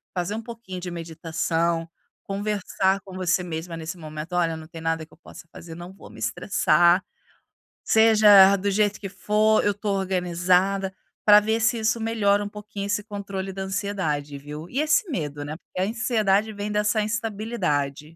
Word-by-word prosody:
fazer 180 +3 -2
um 225 - -4
pouquinho 230 -5 -8
de 180 - -5
meditação, 165 0 -2 0.4
conversar 195 -1 -1
com 190 -1 -10
você 180 0 +1
mesma 165 0 -5
nesse 160 +2 -6
momento, 155 +1 -7
"Olha 165 -2 +1
não 160 0 -10
tem 165 -1 -10
nada 165 0 -1
que - - -24
eu - - -19
possa - - -13
fazer, 165 -1 -10
não 175 +2 -9
vou - - -14
me - - -13
estressar, 175 - +3 0.8
seja 210 -3 +7
do 200 +2 -1
jeito 205 0 +1
que 195 - -6
for, 215 +2 +2
eu 205 - +4
estou 205 0 -2
organizada", 185 +1 +1 0.3
para 210 0 +9
ver 220 +2 0
se 220 +1 +2
isso 220 +1 +1
melhora 205 -3 +2
um 205 - -5
pouquinho 210 -1 -7
esse 205 +1 0
controle 195 -2 -5
da 195 - -6
ansiedade 175 -8 -2
viu? 150 +4 -9
E 265 - -2
esse 310 +5 +2
medo 150 - -4
né, 150 - -5
porque 185 - -10
a 190 - +1
ansiedade 220 -3 +1
vem 205 0 -4
dessa 210 +1 +1
instabilidade. 210 - -2
195 Hz, 175 wpm, -24 LUFS, 170-210 Hz, 0.8 s, para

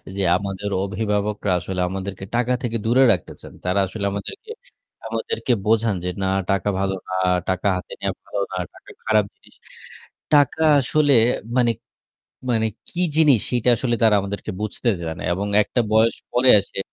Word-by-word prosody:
যে, 100 - -2 0.2
আমাদের 100 0 -4
অভিভাবকরা 105 0 -1
আসলে 90 +1 -4
আমাদেরকে 95 0 -5
টাকা 125 +1 +1
থেকে 115 -2 -2
দূরে 125 +4 +4
রাখতে 90 -6 -2
চান। - - -12
তারা 90 +2 +1
আসলে 100 +2 -5
আমাদেরকে 100 - -7 0.6
আমাদেরকে 455 - -2
বোঝান 110 -1 +2
যে 90 - -2
না 95 - 0 0.2
টাকা 100 0 0
ভালো 95 0 0
না, 95 - -4 0.4
টাকা 95 +2 0
হাতে 90 - -8
নেওয়া - - -2
ভালো 100 - -4
না, - - -4 0.2
টাকা - - -17 0.2
খারাপ 110 -2 +3
জিনিস। - - -23 0.8
টাকা 145 +2 +4 0.2
আসলে 145 +2 +2 0.4
মানে 120 -2 +4 0.8
মানে 110 -1 +1 0.2
কি 180 - -4 0.2
জিনিস; 145 -7 +5
সেটা 125 0 +2
আসলে 120 +1 -1
তারা 110 -2 +5
আমাদেরকে 100 -1 -5
বুঝতে 110 +3 -2
জানে। 80 -1 -5
এবং 100 +3 -3
একটা 120 +4 0
বয়স 110 +1 +4 0.2
পরে 125 +1 +3
এসে, 100 0 -6
105 Hz, 160 wpm, -22 LUFS, 100-120 Hz, 0.8 s, জিনিস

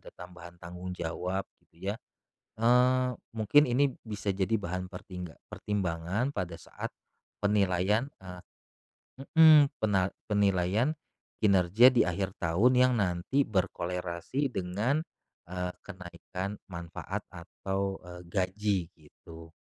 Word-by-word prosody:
ada - - -12
tambahan 85 -1 -12
tanggung 90 +2 -7
jawab 90 +3 -3 0.2
gitu 90 +4 -9
ya, - - -5 0.6
eee, 125 +2 +4 0.3
mungkin 110 +7 +5
ini 135 +2 +2
bisa 105 -3 -3
jadi 95 +3 +1
bahan 90 -1 -4
pertingga 90 -2 -8
pertimbangan 95 +5 -1
pada 85 - -4
saat - - -7 0.5
penilaian, 100 +4 +2
eee 90 -1 -9 0.8
heeh, 160 0 +8 0.2
pena 95 -4 +2 0.2
penilaian 100 - +2 0.5
kinerja 100 +5 +6
di 120 - +5
akhir 95 +2 -2
tahun 95 +10 +3
yang 125 0 +5
nanti 95 +8 +1
berkolerasi 90 - -2
dengan, 105 - 0 0.4
eee, 90 +1 -3
kenaikan 90 +1 -6 0.2
manfaat 85 -1 -5
atau, 95 +3 -4
eee, 90 0 -9
gaji, 100 +2 0 0.2
gitu. 80 +2 -14
95 Hz, 110 wpm, -30 LUFS, 90-110 Hz, 0.8 s, heeh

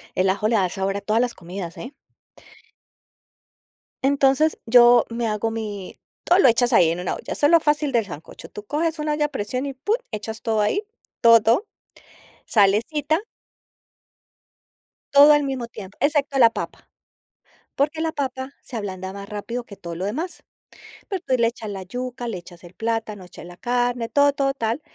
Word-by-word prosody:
El 185 +1 +2
ajo 200 +2 0
le 230 - +2
da 185 -3 +2
sabor 195 +2 -2
a - - -3
todas 215 +3 +1
las 245 -1 0
comidas, 175 -1 -7
¿eh? 255 +5 -8 2.1
Entonces, 280 +2 +3
yo 240 0 +6
me 230 0 -2
hago 215 +1 -1
mi 210 -4 -6 0.2
todo 355 +2 +4
lo 265 - +6
echas 240 +1 +2
ahí, 165 - +6
en 170 +2 -3
una 180 - -2
olla, - - -7
eso 290 - +3
lo 335 0 +7
fácil 295 -2 +1
del 230 -4 +1
sancocho. 155 -3 -10
Tú 210 - -10
coges 315 +6 -1
un 300 0 -3
olla 300 0 +1
a - - -12
presión 255 +1 -3
y 275 - -5
pum, 415 - 0 0.2
echas 220 +1 -5
todo 220 -2 0
ahí, 300 - +1 0.4
todo, 230 -1 +7
todo, 240 - +2 0.8
salecita 255 - +2 1.9
todo 285 +2 +9
al 295 0 +4
mismo 265 -4 -3
tiempo, 205 -4 -11
excepto 285 -1 +1
la 230 -2 +7
papa, - - -7 0.9
porque 295 +3 0
la 320 0 -1
papa 260 -1 -4
se 245 - -8
ablanda 190 -2 -5
más 200 0 -9
rápido 230 +3 -5
que 200 - -12
todo 170 -3 -7
lo 185 +4 -4
demás. 320 - -4 0.7
Después 265 -10 -1
le 230 - +4
echas 230 -2 -6
la 195 -2 -6
yuca, 245 +4 -5
le 210 -5 -3
echas 175 0 -13
el 175 +1 -13
plátano, 225 -3 -3
echas 180 - -12
la 175 0 -11
carne, 245 -1 -1
todo, 285 0 +4
todo, 275 -1 0
tal, 230 +3 -2
235 Hz, 180 wpm, -23 LUFS, 205-280 Hz, 2.1 s, todo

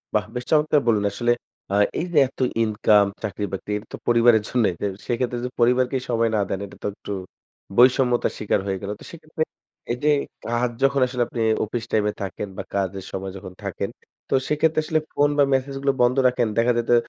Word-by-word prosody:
বাহ! 105 - +2
বেশ 125 0 -3
চমৎকার 150 -1 +4
বললেন 105 -3 +3
আসলে, 120 +3 +1 0.4
আ - - -1 0.3
এই 170 - -1
যে - - +1
এত - - -20 0.2
ইনকাম, 105 -1 +4 0.2
চাকরি-বাকরি 100 0 -4 0.2
তো - - -5
পরিবারের 115 -2 +5
জন্যই। 115 -7 +2
তো - - 0 0.2
সেক্ষেত্রে 120 0 -1
যদি 125 - -3
পরিবারকে 125 +2 +3
সময় 115 -1 +2
না - - +2
দেন, 95 - -2
এটা 100 - -13
তো - - 0
একটু 100 - -9 0.7
বৈষম্যতার 125 0 +4
শিকার 105 - +1
হয়ে 95 -1 -1
গেল। 100 0 -4
তো - - -13
সেক্ষেত্রে 155 -1 -4 0.5
এই 120 - -1
যে 150 - +4 0.4
কাজ 120 +1 0
যখন 135 0 +3
আসলে 125 -1 0
আপনি, 115 - -4 0.2
অফিস 115 +2 -4
টাইমে 105 -1 +2
থাকেন 100 +1 -4
বা - - -3
কাজের 95 -1 -2
সময় 95 0 -4
যখন 95 -1 -9
থাকেন, - - -3 0.4
তো - - -1 0.2
সেক্ষেত্রে 155 +1 +2
আসলে 155 0 +1
ফোন 145 0 +3
বা 145 - +6
মেসেজ 135 +1 0
গুলো 140 0 +2
বন্ধ 125 +1 +4
রাখেন। 125 -2 +1
দেখা 115 +2 +4
যায় 120 - 0
তো 120 - +6
120 Hz, 195 wpm, -23 LUFS, 105-130 Hz, 0.7 s, বা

